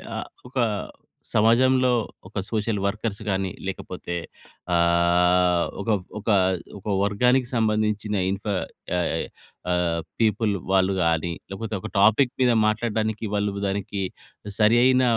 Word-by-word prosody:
ఆహ్, - - -5 0.2
ఒక 130 - -9 0.8
సమాజంలో 125 +4 +4 0.4
ఒక 100 +2 -4
సోషల్ 110 -2 -1
వర్కర్స్‌ 105 +1 -2
గాని 95 -1 0 0.2
లేకపోతే 90 -2 -5 0.6
ఆహ్, 85 +1 +3 0.2
ఒక - - -4 0.3
ఒక 105 - -5 0.5
ఒక - - -23 0.2
వర్గానికి 125 +6 +2
సంబంధించిన 105 -1 0
ఇన్ఫర్ 100 0 -2 0.3
యా 90 - +1 0.7
ఆహ్, 85 -2 +1 0.2
పీపుల్ 110 -1 +2 0.2
వాళ్ళు‌ 95 0 +3
గాని 85 +1 +1 0.2
లేకపోతే 105 +2 -4
ఒక - - -6
టాపిక్ 110 +5 +5
మీద 125 -1 +5 0.2
మాట్లాడడానికి 110 0 -1
వాళ్ళు 100 -1 -1
దానికి 100 0 -3 0.6
సరియై‌న 120 +4 +5
105 Hz, 110 wpm, -24 LUFS, 95-115 Hz, 0.8 s, టాపిక్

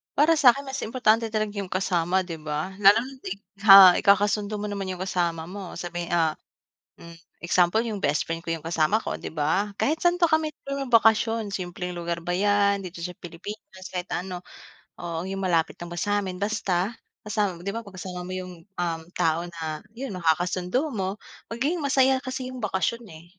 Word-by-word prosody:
Para 315 +3 +4
sa'kin 275 0 +5
mas 270 0 -5
importante 225 -1 +2
talaga 215 -1 -2
'yung 195 - -4
kasama 185 0 +1
'di 165 -3 -6
ba, 155 +4 -3
lalo 205 +2 +7
na 270 +1 -9
'di 185 - -7 0.4
ha, 195 -2 +11
ikakasundo 205 +1 +2
mo 210 - -3
naman 200 -2 -4
'yung 185 -1 -5
kasama 170 -3 -1
mo 195 -2 -7
sabi, 175 -1 -5
ah, 160 -2 +2 0.6
hmm, 170 0 -12 0.2
example 175 +4 +3
'yung 220 -4 -4
bestfriend 165 +3 0
ko 165 - -2
'yung 165 -2 -4
kasama 165 +6 +2
ko - - -4
'di - - -7
ba. 165 +7 0
Kahit 315 +3 +1
saan 350 0 +3
pa 340 - +6
kami 315 -1 +1
magbakasyon, 230 -5 +2
simpleng 180 -1 -4
lugar 170 0 -3
ba 175 +1 -2
'yan, 200 0 +2
dito 175 -1 -8
sa 180 +1 -5
Pilipinas, 185 +2 -9
kahit 180 0 -5
ano, 180 0 -4 0.6
oo 170 0 -4
'yung 195 0 -4
malapit 170 -3 +1
lang 175 0 -7
ba 175 - -5
sa'min. 200 -2 -1
Basta 205 -1 -1 0.3
kasama 205 -5 -1
'di 200 +3 -4
ba 230 - -4
'pag 195 -2 -12
kasama 180 -1 -6
mo 185 - -6
'yung, 185 -1 -5
um, 175 -4 -3 0.2
tao 165 +1 +2
na 160 -3 -6
'yun 255 -4 -5
na 180 - -6
nakakasundo 180 - +1
mo 195 0 -2 0.3
magiging 295 +8 -1
masaya 265 -1 +4
kasi 260 -1 -4
'yung 255 -2 -8
bakasyon 210 +4 -1
eh. 160 +1 -12
190 Hz, 185 wpm, -25 LUFS, 175-220 Hz, 0.6 s, ha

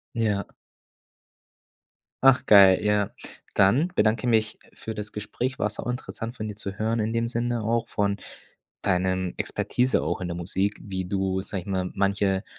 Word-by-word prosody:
Ja. 105 -3 +1 1.8
Ach 130 -1 +6
geil, 100 -3 +7
ja. 105 -1 +1 0.4
Dann 120 - +4
bedanke 110 +3 +2
mich 110 -2 +1 0.2
für 110 - -6
das 105 -1 -6
Gespräch. 120 +5 -4
War 105 - 0
sauinteressant 120 0 -5
von 110 0 -4
dir 105 - -5
zu 100 -2 -6
hören 110 +1 0
in 110 +1 -1
dem 115 0 0
Sinne 120 -1 -1
auch, 115 +1 0
von 100 0 0 0.6
deinem 95 -1 0
Expertise 125 +1 0
auch - - -2
in 90 - -3
der 85 - -4
Musik, 95 +4 -1
wie 95 -2 -4
du, 95 -1 -1
sage 95 -3 -5
ich - - -17
mal, 95 -2 -1
manche 100 0 +1
105 Hz, 155 wpm, -25 LUFS, 95-115 Hz, 1.8 s, geil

